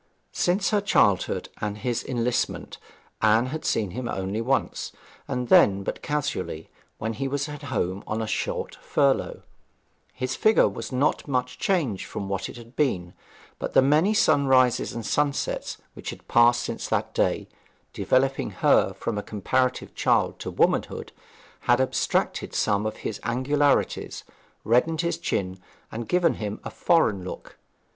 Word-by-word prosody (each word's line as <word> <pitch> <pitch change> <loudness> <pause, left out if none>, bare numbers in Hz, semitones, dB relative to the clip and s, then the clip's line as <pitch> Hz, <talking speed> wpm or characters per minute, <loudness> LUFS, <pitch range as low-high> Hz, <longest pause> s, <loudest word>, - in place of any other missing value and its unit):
Since 185 +3 +1
her 210 -1 +2
childhood 100 - +2
and 105 0 -2
his 120 +2 -2
enlistment 120 -1 -2 0.4
Anne 110 +2 +4
had 155 +5 -5
seen 105 -5 0
him 120 +3 -4
only 95 +3 -2
once, 130 +2 -1 0.4
and 125 -2 -2
then 100 -3 +5
but - - -4
casually, 145 - -3 0.3
when 110 +1 -3
he 135 +5 -3
was 140 +1 -1
home 130 - -3
on 110 - -2
a 110 - -1
short - - -2
furlough. 140 -2 +1 0.7
His 130 0 -3
figure 220 0 +4
was - - -6
not 135 +5 +1
much 125 -2 -2
changed 150 - 0
from 100 - -5
what 95 -1 -3
it - - -10
had 120 +1 -13
been; 90 - 0 0.5
but - - -4
the - - +6
many 155 +10 +3
sunrises 130 - +3
and 115 -2 -5
sunsets 145 +2 -1 0.2
which - - -7
had - - -9
passed 120 +1 +5
since - - -4
that - - -1
day, - - 0 0.5
developing 135 +1 +1
her - - +3
from 110 -3 -3
a - - -2
comparative 125 +6 -1
child - - +1
to - - -5
womanhood, - - 0 0.6
had 120 +1 +6
abstracted 130 - 0
some 105 +1 +1
of 110 - -5
his 105 - -3
angularities, 135 +5 +1 0.4
reddened 155 +8 +2
his 170 0 0
skin, 95 - -2 0.3
and 115 0 -6
given 180 -1 +3
him 105 0 -3
a - - -6
foreign 105 - +2
look. 90 - -9
125 Hz, 150 wpm, -25 LUFS, 105-145 Hz, 0.7 s, the